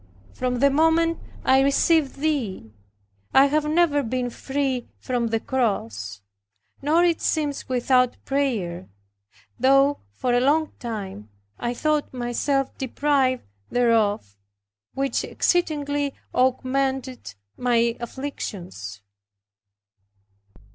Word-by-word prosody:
From 250 -1 -2
the 280 0 +5
moment 325 +3 +3 0.3
I 265 0 +5
received 280 +1 +3
Thee 270 - -2 0.6
I 270 - +8
have 300 +2 +1
never 310 -3 +3
been 250 0 -2
free 265 -1 -2
from 245 -2 -1
the 225 0 0
cross, 110 - -2 0.6
nor 310 +5 +3
it 340 -2 +2
seems 295 -4 -1
without 250 0 +2
prayer 220 - -1 0.7
though 275 +3 +4
for 240 - -2
a 245 - +4
long 300 +5 +2
time 195 - -6 0.3
I 240 0 -2
thought 300 -1 0
myself 255 +3 -1
deprived 265 -1 +1 0.3
thereof, 215 - +1 0.6
which 275 0 0
exceedingly 290 -5 0 0.2
augmented 260 - 0 0.2
my 235 -1 +2
afflictions. 185 - -6
260 Hz, 100 wpm, -24 LUFS, 235-285 Hz, 0.7 s, I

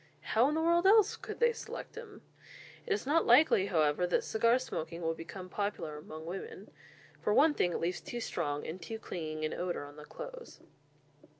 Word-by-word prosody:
How 235 +5 +3
in 300 - -1
the 320 - +1
world 340 +2 +4
else 425 0 +6
could - - -8
they 475 0 +4
select - - -7
them? 455 -3 -10 0.6
It 420 - +2
is 415 - -2
not 310 +4 +2
likely, 240 -6 +6
however, 155 0 +2
that 175 - +1
cigar 230 +2 +3
smoking 170 -9 -5
will 165 0 +1
become 175 +3 -8
popular 185 -6 -3
among 155 +1 -9
women. 195 - -7 0.5
For 210 - +1
one 305 +2 +6
thing, 180 - +1
it - - -1
leaves 175 +2 -2
too 240 - -5
strong 150 -9 -2
and 175 +3 -6
too 225 +6 -5
clinging 155 -7 -4
an 155 - -2
odour 175 -4 -3
on 145 +1 -13
the 150 - -10
clothes. - - -9
195 Hz, 195 wpm, -32 LUFS, -, 0.6 s, else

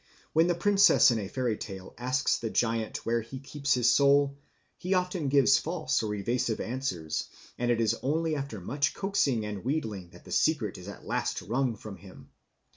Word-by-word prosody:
When 160 +2 +4
the 175 - +1
princess 195 -7 +5
in 115 - 0
the 100 - -4
fairy 125 0 -1
tale 95 -3 -8
asks 130 +3 0
the 115 - -3
giant 115 -1 -1
where 115 0 +1
he 115 +4 -8
keeps 140 +1 -1
his 120 -1 +4
soul, 140 +1 +4 0.4
he 185 +2 -1
often 180 -4 -1
gives 135 -1 +5
false 155 -5 -1
or 105 -2 -2
evasive 120 +3 -1
answers, 110 - -3 0.3
and 120 0 0
it 120 -1 +2
is 115 0 +2
only 160 +3 0
after 135 -7 -5
much 140 +10 -1
coaxing 140 - 0
and 105 -2 -5
wheedling 110 - -3
that 90 +1 -17
the - - -11
secret 115 - +1
is 90 - -11
at 100 - -10
last - - -2
wrung 125 +1 0
from 105 -2 -9
him. 95 -8 -15
125 Hz, 190 wpm, -29 LUFS, 110-145 Hz, 0.4 s, princess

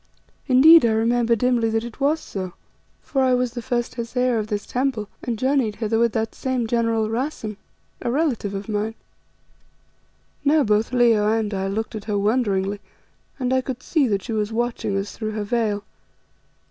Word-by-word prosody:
Indeed 310 +5 +8
I 230 -2 +3
remember 235 +1 +2
dimly 235 0 +1
that 225 0 0
it 235 +2 -9
was 290 +3 +2
so, 185 - -6 0.5
for 270 - -1
I 255 -1 +4
was 250 -1 -1
the 240 - -4
first 240 0 -2
Hesea 245 0 0
of 215 - -3
this 210 -2 -3
Temple, 250 -5 -1
and 235 -2 -3
journeyed 260 -3 +1
hither 225 0 0
with 235 -1 +3
that 225 0 -1
same 260 -3 -2
general 230 -1 +1
Rassen, 225 -2 -3 0.5
a - - -2
relative 245 -8 0
of 195 +2 -5
mine." 215 +1 -2 1.5
Now 295 +1 +4
both 215 0 +1
Leo 235 -4 +4
and 220 -2 0
I 190 0 -1
looked 220 +3 -3
at 215 -2 -6
her 210 -2 -1
wonderingly, 205 -2 0 0.6
and 255 -1 -1
I 260 - +3
could 255 -1 -6
see 300 -6 +2
that 200 -4 -1
she 225 - -4
was 210 0 -1
watching 230 -3 -1
us 195 +1 -3
through 215 -1 -4
her 210 -1 -2
veil. 210 -2 -1
230 Hz, 180 wpm, -23 LUFS, 210-250 Hz, 1.5 s, Indeed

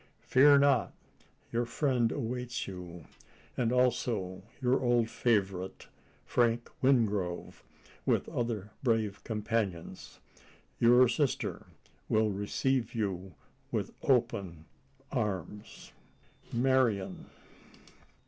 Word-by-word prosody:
Fear 140 +2 +6
not! 140 -3 +3 0.6
your 120 0 0
friend 120 -2 +1
awaits 125 -1 -3
you 90 -4 -8 0.5
as 120 -2 0
also 120 -7 0 0.2
your 125 -1 +2
old 120 -2 +2
favourite, 95 -5 -1 0.4
Frank 120 -1 +1
Wingrove, 105 -9 +1 0.4
with - - +1
other 110 -4 -3
brave 110 -5 0
companions. 105 -5 -3 0.6
Your 125 +2 +6
sister 135 +3 -1 0.4
will 110 -1 +2
receive 115 +5 -1
you 95 -5 -3 0.4
with - - -2
open 100 - 0 0.5
arms." 105 - -4 0.6
"Marian." 120 -7 +1
115 Hz, 85 wpm, -31 LUFS, 100-125 Hz, 0.6 s, Fear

